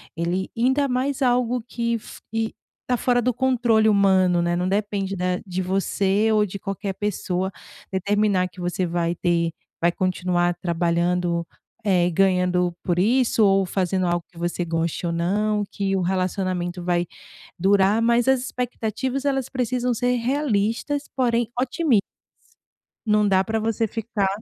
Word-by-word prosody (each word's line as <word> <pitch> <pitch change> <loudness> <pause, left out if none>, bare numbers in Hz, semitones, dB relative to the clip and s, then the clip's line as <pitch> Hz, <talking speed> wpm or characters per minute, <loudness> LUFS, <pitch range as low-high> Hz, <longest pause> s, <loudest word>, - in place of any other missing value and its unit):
ele 175 +3 -2
ainda 265 +4 +2
mais 260 +2 -1
algo 245 -1 +2
que 235 -1 -1
f 225 - -9
que 225 0 -1 0.3
tá 250 - +2
fora 245 0 +2
do 250 +1 +1
controle 240 -3 +2
humano, 190 -3 +4
né, 175 0 0
não 180 +1 -1
depende 200 0 -1
da 180 0 -1
de 185 0 -3
você 195 +3 +1
ou 210 -1 +3
de 200 +1 -6
qualquer 195 0 -4
pessoa 190 -2 -2 0.4
determinar 200 0 +1
que 180 0 -12
você 180 +1 -1
vai 170 0 -1
ter 170 -1 0 0.3
vai 170 +1 +4
continuar 180 -1 0
trabalhando, 170 0 0 0.4
eh, 180 -3 +3
ganhando 180 -1 +2
por 175 -1 0
isso 230 +2 +3
ou 195 -1 +3
fazendo 185 0 0
algo 175 -1 0
que 175 - -20
você 175 +1 -2
goste 165 +1 -2
ou 170 - -1
não, 205 +5 0
que 195 -1 -1
o 190 - 0
relacionamento 185 -1 -1
vai 175 0 +1 0.5
durar, 195 +3 +3
mas 235 +1 +3
as 265 -2 +4
expectativas, 250 +1 -3
elas 270 -3 0
precisam 250 -1 -1
ser 245 +2 +1
realistas 245 +1 0
porém 240 -3 +1
otimis 260 -3 +2 1.0
não 210 -1 +3
dá 190 -1 +3
pra 220 +1 -1
você 225 0 0
ficar 220 -2 -2
195 Hz, 150 wpm, -23 LUFS, 180-235 Hz, 1.0 s, humano